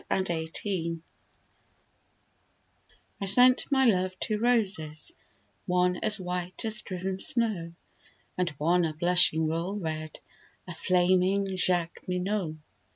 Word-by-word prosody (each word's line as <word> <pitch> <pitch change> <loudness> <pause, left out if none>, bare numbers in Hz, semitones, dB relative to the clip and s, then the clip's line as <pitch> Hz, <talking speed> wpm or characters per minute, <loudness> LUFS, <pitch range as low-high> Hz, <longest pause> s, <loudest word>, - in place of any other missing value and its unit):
The - - +2
White 165 -4 -2
Flag 170 -5 -2 2.2
I - - -1
sent 250 +8 +5
my 265 -1 +3
love 185 -4 +1
two 215 -1 -1
roses, 200 -10 0 0.6
one 180 0 +1
As 215 +1 +3
white 180 +2 -3
as 215 -1 +1
driven 185 0 -5
snow, 200 -8 0 0.6
And 180 -1 0
one 175 +4 +2
a 155 -2 -2
blushing 175 -1 +3
royal 170 +6 -2
red, 155 -4 -5 0.5
A 175 - -6
flaming 185 +3 +1
Jacqueminot. 180 0 -1
180 Hz, 110 wpm, -28 LUFS, 170-200 Hz, 2.2 s, sent